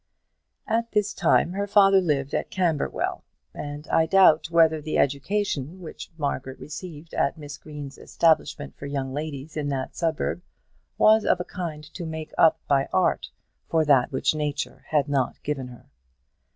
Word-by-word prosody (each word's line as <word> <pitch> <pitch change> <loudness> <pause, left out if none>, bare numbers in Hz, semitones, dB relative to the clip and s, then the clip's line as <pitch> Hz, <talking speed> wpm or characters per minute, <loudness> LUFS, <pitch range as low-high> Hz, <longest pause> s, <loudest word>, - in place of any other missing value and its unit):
At 230 0 -1
this 210 0 +1
time 175 - +3
her 200 +2 -2
father 195 -1 +6
lived 145 -5 -1
at - - -1
Camberwell, 170 -6 -1 0.3
and 145 +1 -7
I 160 0 +3
doubt 165 -3 +5
whether 160 -2 +4
the 155 +1 -2
education 155 +2 -1
which 170 -4 -9
Margaret 135 -3 -3
received 160 +1 -9
at 140 - 0
Miss 145 -2 -8
Green's 145 -3 -9
establishment 155 -3 +1
for 140 - -8
young 135 -2 -3
ladies 150 0 -5
in 150 -2 -2
that 135 -2 -3
suburb 165 +1 -1 0.6
was 220 0 +5
of 180 - +2
a 180 - -3
kind 165 -5 -6
to 175 - -6
make 160 0 -6
up 160 -1 +5
by 135 -1 +2
art 95 - +1 0.4
for 160 -1 +2
that 140 -2 +4
which 130 - +1
nature 150 -1 -3
had 150 -2 +1
not 140 -3 -1
given 140 -3 -3
her. 125 -1 -13
155 Hz, 160 wpm, -25 LUFS, 140-170 Hz, 0.6 s, father